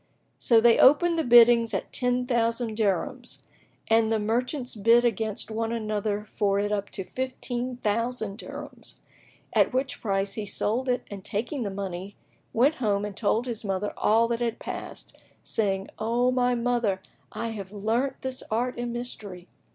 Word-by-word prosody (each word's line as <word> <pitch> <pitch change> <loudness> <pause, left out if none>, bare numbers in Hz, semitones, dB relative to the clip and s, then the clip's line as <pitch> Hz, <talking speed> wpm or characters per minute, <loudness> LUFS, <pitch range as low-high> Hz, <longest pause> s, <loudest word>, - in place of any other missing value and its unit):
So 230 -2 +5
they 230 0 +5
opened 330 +5 +5
the - - +1
biddings 235 -2 +6
at - - -4
ten 250 0 0
thousand 230 -2 0
dirhams 230 +5 -2 0.4
and 225 0 +3
the 225 - +3
merchants 245 +5 -1
bid 230 +3 +4
against 220 -1 0
one 225 +1 -2
another 215 -2 -2
for 200 -2 0
it 205 +1 0
up 200 -1 -1
to 190 - -3
fifteen 255 +1 -4
thousand 225 -1 -2
dirhams,[FN#16] - - -8 0.6
at - - +3
which 260 +1 -1
price 195 -2 0
he 215 - -4
sold 235 +6 0
it 250 - 0
and 200 -2 -7
taking 240 +8 -3
the 210 - -2
money, 195 0 -5 0.4
went 265 +7 +3
home 205 -3 +1
and 205 -2 -6
told 220 +3 +1
his 235 -3 -4
mother 195 0 -2
all 225 +2 +3
that 235 -1 -1
had 235 -2 -1
passed, - - -7 0.2
saying, 195 -3 0
"O 240 +3 +1
my 250 -1 +2
mother, 235 -5 0 0.3
I 230 - -3
have 200 -4 -7
learnt 225 +6 -1
this 260 -1 -2
art 240 +3 -1
and 240 0 -2
mystery." 215 -7 -6
230 Hz, 165 wpm, -26 LUFS, 205-245 Hz, 0.6 s, biddings